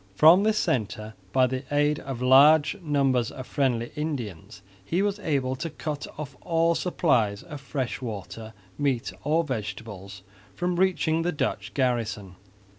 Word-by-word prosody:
From 160 - +7
this 215 +1 +2
centre, 110 - -1 0.2
by 130 +2 +4
the 130 +1 -3
aid 145 +1 +2
of 130 -2 -5
large 145 +4 +6
numbers 135 -6 +1
of 130 - -8
friendly 120 -4 0
Indians, 110 - -5 0.2
he 175 - 0
was 205 0 -1
able 135 -8 -1
to 165 +5 -4
cut 150 -1 -5
off 145 -3 -7
all 165 0 +2
supplies 125 - +1
of 150 -2 -9
fresh 130 -2 -3
water, 110 -1 -7 0.2
meat 135 -5 0
or 160 +3 +2
vegetables 105 - -6 0.3
from 180 - -1
reaching 175 -3 +2
the 175 +1 0
Dutch 145 - -3
garrison. 115 -7 -1
135 Hz, 145 wpm, -26 LUFS, 115-155 Hz, 0.3 s, From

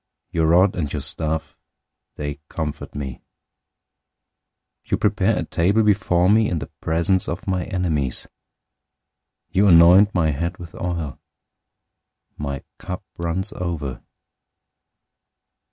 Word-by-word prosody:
Your 80 -1 +1
rod 90 +4 +4
and 75 -5 -2
your 75 - -3
staff, 80 +2 -1 0.6
they 75 -1 -5
comfort 75 -3 -5
me. 65 -4 -5 1.7
023:005 - - -19
You - - +4
prepare 105 +1 +2
a - - 0
table 100 +6 +2
before 95 -4 +3
me 110 +2 +4
in 85 - -1
the - - -6
presence 85 +3 +1
of 85 +4 -4
my 90 -2 -1
enemies. 80 -9 -1 1.2
You 100 +2 +3
anoint 90 +4 +7
my 80 -3 +3
head 85 +4 -3
with 85 -2 -10
oil. 85 -7 -4 1.2
My 70 -2 -4 0.2
cup 90 +2 -6
runs 85 +2 -2
over. 80 -8 -4
85 Hz, 120 wpm, -22 LUFS, 75-95 Hz, 1.7 s, anoint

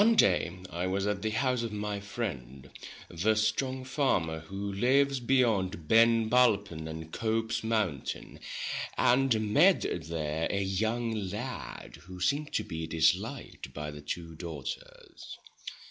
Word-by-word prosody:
One 225 +2 +5
day 90 - +3
I 90 +2 -2
was 95 +1 0
at 105 -1 -1
the 110 - 0
house 125 +2 +1
of 115 -2 -3
my 105 -1 -3
friend 70 - -6 0.4
the 100 +6 +1
strong 130 +5 0
farmer, 125 - 0
who 95 +5 -5
lives 135 +6 +3
beyond 110 - +1
Ben 115 +1 +5
Bulben 105 -9 +2
and 80 0 -7
Cope's 115 +2 -1
mountain, 105 - -2 0.6
and 120 -5 +3
met - - +5 0.2
there 80 -1 -1
a 100 0 0
young 110 +5 0
lad 110 - -5
who 90 0 -9
seemed 145 +11 0
to - - +1
be 80 0 -5
dis 80 0 +4
liked 105 - -8
by 75 0 -4
the 75 0 -9
two 80 +3 -5
daughters. 80 -4 -8
105 Hz, 140 wpm, -30 LUFS, 85-115 Hz, 0.6 s, One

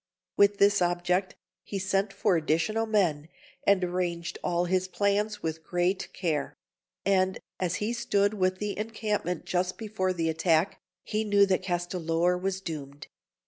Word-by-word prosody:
With 200 0 +4
this 200 -1 +4
object, 180 +2 +1 0.3
he 200 - -5
sent 195 +1 0
for 195 -1 +1
additional 165 +8 +1
men, 170 -9 +1 0.4
and 200 -2 +5
arranged 175 -1 -2
all 175 0 +1
his 185 +1 +1
plans 205 +2 0
with 160 0 -3
great 180 +2 -1
care; 155 -6 -2 0.5
and 190 -1 +2 0.2
as 180 -1 0
he 210 +4 -1
stood 205 -4 +1
within 185 -2 +1
the 210 -1 -3
encampment 215 -5 -2
just 180 0 -1
before 210 -4 -1
the 170 -3 -1
attack, 160 +2 +1 0.2
he 215 +1 -1
knew 205 -1 +5
that 190 -1 +1
Castellor 175 -1 0
was 190 +1 -2
doomed. 145 -5 -7
185 Hz, 145 wpm, -28 LUFS, 175-200 Hz, 0.5 s, and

